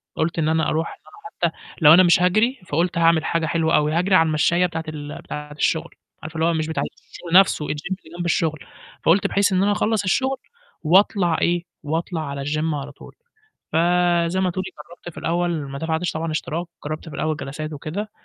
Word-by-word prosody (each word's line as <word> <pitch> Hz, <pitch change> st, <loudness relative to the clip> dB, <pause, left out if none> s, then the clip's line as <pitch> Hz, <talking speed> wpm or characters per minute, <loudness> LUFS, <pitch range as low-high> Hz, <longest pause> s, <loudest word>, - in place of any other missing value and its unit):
قُلت 165 Hz, +1 st, -1 dB
إن 155 Hz, 0 st, +1 dB
أنا 160 Hz, 0 st, +1 dB
أرُوح 160 Hz, +2 st, 0 dB
إن -, -, -13 dB
أنا 420 Hz, 0 st, -4 dB
حتى -, -, -27 dB, 0.2 s
لو 150 Hz, 0 st, +9 dB
أنا 185 Hz, +2 st, +8 dB
مش 175 Hz, 0 st, +4 dB
هاجري، 215 Hz, +9 st, +2 dB
فقُلت 170 Hz, +3 st, 0 dB
هاعمل 165 Hz, -1 st, +3 dB
حاجة 165 Hz, -1 st, 0 dB
حلوة 160 Hz, 0 st, +1 dB
أوي، 150 Hz, 0 st, +2 dB
هاجري 180 Hz, +3 st, +2 dB
على 165 Hz, -2 st, +5 dB
المشّاية 160 Hz, +3 st, +2 dB
بتاعة 165 Hz, -2 st, -3 dB
ال 150 Hz, -1 st, -7 dB
بتاعة 150 Hz, 0 st, -7 dB
الشغل، 155 Hz, +2 st, -1 dB, 0.3 s
عارفة 155 Hz, +1 st, -8 dB
اللي 160 Hz, -, +1 dB
هو 170 Hz, -, +2 dB
مش 155 Hz, -1 st, -1 dB
بتاعة 160 Hz, -, -2 dB, 0.3 s
الشغل 175 Hz, +1 st, +4 dB
نَفْسه، 185 Hz, -5 st, +2 dB
الgym -, -, -6 dB, 0.4 s
اللي 160 Hz, +2 st, -13 dB
جنب 175 Hz, -, -3 dB
الشغل، 160 Hz, -2 st, 0 dB, 0.5 s
فقُلت 180 Hz, +4 st, +4 dB
بحيث 200 Hz, 0 st, +2 dB
إن 185 Hz, -, +3 dB
أنا 205 Hz, -, +2 dB
أخلّص 210 Hz, 0 st, +1 dB
الشغل 265 Hz, +8 st, +1 dB, 0.5 s
وأطلع 175 Hz, 0 st, +3 dB
إيه، 175 Hz, 0 st, +1 dB, 0.2 s
وأطلع 160 Hz, +2 st, -2 dB
على 140 Hz, 0 st, -5 dB
الgym 155 Hz, +2 st, -1 dB
على 145 Hz, 0 st, -6 dB
طول، 140 Hz, -, -15 dB, 0.6 s
فزي 175 Hz, +1 st, +2 dB
ما 185 Hz, -, +2 dB
تقولي 185 Hz, +1 st, -3 dB, 0.2 s
جرّبت 175 Hz, 0 st, -10 dB
في -, -, -17 dB
الأول 175 Hz, +1 st, 0 dB, 0.2 s
ما 140 Hz, -, -6 dB
دفعتش 160 Hz, +2 st, -1 dB
طبعًا 160 Hz, 0 st, -3 dB
اشتراك، 160 Hz, +2 st, -3 dB, 0.2 s
جرّبت 155 Hz, +2 st, -5 dB
في -, -, -9 dB
الأول 155 Hz, 0 st, -1 dB
جلسات 155 Hz, +2 st, -6 dB
وكده، 175 Hz, +9 st, -5 dB
165 Hz, 205 wpm, -22 LUFS, 155-180 Hz, 0.6 s, لو